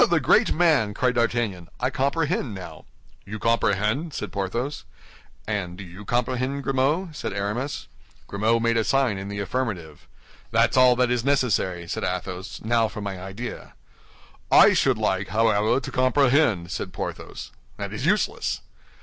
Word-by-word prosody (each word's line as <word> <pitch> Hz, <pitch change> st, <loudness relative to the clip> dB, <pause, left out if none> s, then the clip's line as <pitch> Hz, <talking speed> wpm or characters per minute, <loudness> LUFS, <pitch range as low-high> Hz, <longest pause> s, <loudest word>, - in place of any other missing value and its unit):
"Oh, -, -, +4 dB
the 170 Hz, -5 st, +3 dB
great 135 Hz, -, +4 dB
man!" 150 Hz, -12 st, +3 dB
cried 125 Hz, -1 st, +1 dB
D'Artagnan. 115 Hz, -7 st, -1 dB
"I 125 Hz, +1 st, 0 dB
comprehend 140 Hz, -, 0 dB
now." 95 Hz, -2 st, -9 dB, 0.4 s
"You 105 Hz, +2 st, -7 dB
comprehend?" 115 Hz, -, 0 dB
said -, -, -4 dB
Porthos. 120 Hz, +9 st, -3 dB, 0.6 s
"And 95 Hz, -5 st, -3 dB
do 100 Hz, -, -7 dB
you 95 Hz, +3 st, -11 dB
comprehend, 130 Hz, +4 st, -1 dB
Grimaud?" 150 Hz, +6 st, 0 dB
said -, -, -4 dB
Aramis. 105 Hz, +8 st, -3 dB, 0.4 s
Grimaud 110 Hz, +3 st, +1 dB
made 115 Hz, 0 st, +2 dB
a 115 Hz, -, +2 dB
sign 130 Hz, -6 st, +1 dB
in 95 Hz, -, -6 dB
the 100 Hz, 0 st, -5 dB
affirmative. 100 Hz, -, -4 dB, 0.4 s
"That's -, -, +2 dB
all 130 Hz, -1 st, +6 dB
that 125 Hz, 0 st, +2 dB
is 120 Hz, -2 st, +1 dB
necessary," 110 Hz, -10 st, +1 dB
said -, -, -3 dB
Athos; 90 Hz, +1 st, -4 dB
"now 115 Hz, 0 st, +2 dB
for 110 Hz, 0 st, -8 dB
my 95 Hz, -2 st, -5 dB
idea." 100 Hz, +6 st, -7 dB, 0.8 s
"I -, -, +8 dB
should 130 Hz, -4 st, +2 dB
like, 95 Hz, -3 st, 0 dB
however, 110 Hz, +3 st, +2 dB
to -, -, -7 dB
comprehend," 130 Hz, -, +2 dB
said -, -, -4 dB
Porthos. -, -, -6 dB, 0.3 s
"That -, -, -5 dB
is -, -, -5 dB
useless." -, -, 0 dB
115 Hz, 155 wpm, -24 LUFS, 100-130 Hz, 0.8 s, I